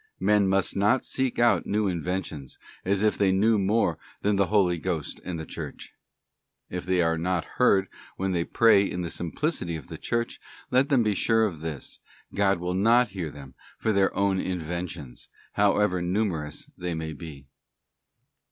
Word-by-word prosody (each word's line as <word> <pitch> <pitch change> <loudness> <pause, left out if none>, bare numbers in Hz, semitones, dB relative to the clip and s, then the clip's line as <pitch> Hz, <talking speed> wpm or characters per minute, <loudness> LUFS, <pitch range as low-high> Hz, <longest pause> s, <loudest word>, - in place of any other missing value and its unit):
Men 105 -2 +3
must 95 -1 +1
not 105 +6 +2
seek 130 -2 -1
out 120 0 +3
new 105 0 +1
inventions, 85 -5 -3 0.3
as 100 +2 0
if 110 - +2
they 100 -2 +4
knew 105 +3 +3
more 105 +4 +1 0.2
than 105 0 +2
the 100 -1 +2
Holy 90 -5 +2
Ghost 85 -4 -3
and 85 -3 -4
the 80 - -5
Church. - - -8 0.8
If 90 0 -5
they 90 -1 +3
are 80 0 +1
not 90 0 0 0.2
heard 100 -6 +4 0.3
when 95 0 -1
they 85 -2 +1
pray 115 +1 +5
in 90 -3 -3
the 85 - -4
simplicity 90 - -2
of 75 -5 -9
the - - -7
Church, 115 0 -2 0.3
let 130 +2 +3
them 130 -5 +4
be 105 -1 +2
sure 110 +2 +2
of 85 -7 -4
this—God 85 +6 -3
will 90 +1 -2
not 115 +5 +4
hear 90 -5 -4
them 70 -2 -11 0.2
for 110 - 0
their 100 -2 +3
own 100 -1 +2
inventions, 85 -7 -5 0.2
however 100 -2 +2
numerous 85 -5 -2
they 90 -1 -3
may 80 0 -4
be. 70 -2 -10
95 Hz, 170 wpm, -26 LUFS, 85-105 Hz, 0.8 s, pray